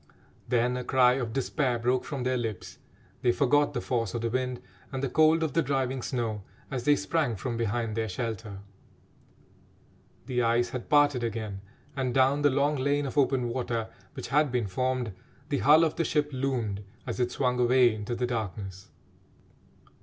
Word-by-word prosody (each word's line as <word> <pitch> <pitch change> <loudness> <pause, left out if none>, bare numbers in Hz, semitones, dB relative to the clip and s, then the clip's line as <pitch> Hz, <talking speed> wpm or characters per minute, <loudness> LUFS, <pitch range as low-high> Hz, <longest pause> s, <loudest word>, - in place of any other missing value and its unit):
Then 125 +1 +1
a 125 - -3
cry 125 -1 +4
of 125 -3 -2
despair 135 0 0
broke 125 +2 0
from 140 -4 -4
their 130 0 +1
lips 110 -6 -4 0.4
they 120 - +4
forgot 145 +3 +2
the 120 - -1
force 115 -5 -1
of 120 - -2
the 115 -1 -1
wind 125 0 -1 0.3
and 135 0 -4
the 135 - 0
cold 155 +4 +4
of 155 -4 -1
the 165 - +3
driving 135 -2 -1
snow 115 -5 -2 0.3
as 125 -3 -3
they 145 - +5
sprang 150 -6 0
from 120 +4 -4
behind 115 -1 -1
their 110 -1 -1
shelter. 110 -1 -5 1.6
The 125 -1 0
ice 120 +1 +2
had 125 -2 -6
parted 145 -4 +4
again, 110 -4 -4 0.3
and, 130 -3 -1
down 135 +2 +4
the 145 - +5
long 145 +2 +1
lane 140 +2 +1
of 135 - -5
open 135 -3 +2
water 115 -2 -2 0.3
which - - -6
had 145 -1 +3
been 120 -3 0
formed, 125 +2 -1 0.4
the 145 - 0
hull 155 +3 +6
of 160 - 0
the 165 - +2
ship 150 -1 0
loomed 120 -7 -2 0.2
as - - -4
it 120 -1 +1
swung 125 -2 0
away 125 -1 +5
into 110 +2 -4
the 125 +1 -1
darkness. 100 -5 -5
125 Hz, 180 wpm, -28 LUFS, 115-135 Hz, 1.6 s, hull